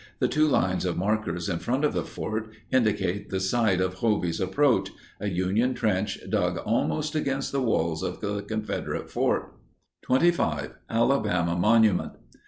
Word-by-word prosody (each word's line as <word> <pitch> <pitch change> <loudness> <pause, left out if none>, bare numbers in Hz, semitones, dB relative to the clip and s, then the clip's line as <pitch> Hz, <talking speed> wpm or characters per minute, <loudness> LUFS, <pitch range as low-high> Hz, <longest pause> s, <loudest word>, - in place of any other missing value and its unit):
The - - +2
two 155 +1 +2
lines 95 - +1
of 90 -2 -1
markers 90 -3 -1
in 85 -4 -1
front 130 +5 0
of 150 - +1
the - - -1
fort 110 0 -4 0.2
indicate 105 -5 +1
the 95 - -1
site 95 0 +2
of 95 0 0
"Hovey's 100 -8 0
Approach"—a 110 0 0
Union 100 +8 +1
trench 105 -1 0
dug - - 0
almost 80 - -1
against 140 -3 -1
the 140 - 0
walls 85 -9 0
of - - -4
the 100 -1 -2
Confederate 110 0 -4
fort. - - 0 0.5
25. 130 - +1 0.2
ALABAMA 110 -8 +1
MONUMENT. 105 +1 +3
105 Hz, 145 wpm, -26 LUFS, 90-120 Hz, 0.5 s, MONUMENT